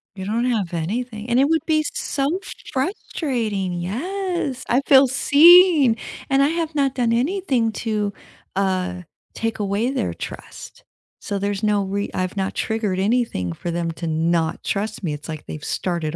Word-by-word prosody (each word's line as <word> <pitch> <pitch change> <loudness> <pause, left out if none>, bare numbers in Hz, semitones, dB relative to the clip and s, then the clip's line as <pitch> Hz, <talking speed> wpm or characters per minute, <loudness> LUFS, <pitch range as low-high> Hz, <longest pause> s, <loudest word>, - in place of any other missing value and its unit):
You 190 - -6
don't 230 +4 0
have 210 -8 -1
anything, 215 +6 -3
and 240 +2 +3
it 275 - +5
would 320 0 +1
be 310 -1 +2
so 290 +6 -1 0.3
frustrating. 245 - -2
Yes, 285 - -3
I 255 +3 +3
feel 270 -1 +7
seen, 300 -1 +6 0.3
and 270 0 +3
I 280 - +5
have 325 0 -2
not 275 -2 +1
done 235 -3 +1
anything 260 - +1
to, 210 -2 -2 0.4
uh, 185 -2 -1 0.3
take 225 -1 -2
away 205 +5 0
their 270 - -1
trust, - - -9 0.4
so 200 - -3
there's 200 0 -2
no 210 -1 +2
re 200 +1 -2
I've 185 +2 -2
not 190 0 -2
triggered 215 -4 -1
anything 200 - 0
for 175 - -6
them 170 0 -2
to 165 0 -5
not 160 +1 0
trust 210 +1 -3
me, 160 -4 -1
it's 150 +2 -8
like 155 -1 -6
they've 155 - -7
started 170 -3 -2
220 Hz, 165 wpm, -22 LUFS, 185-275 Hz, 0.4 s, feel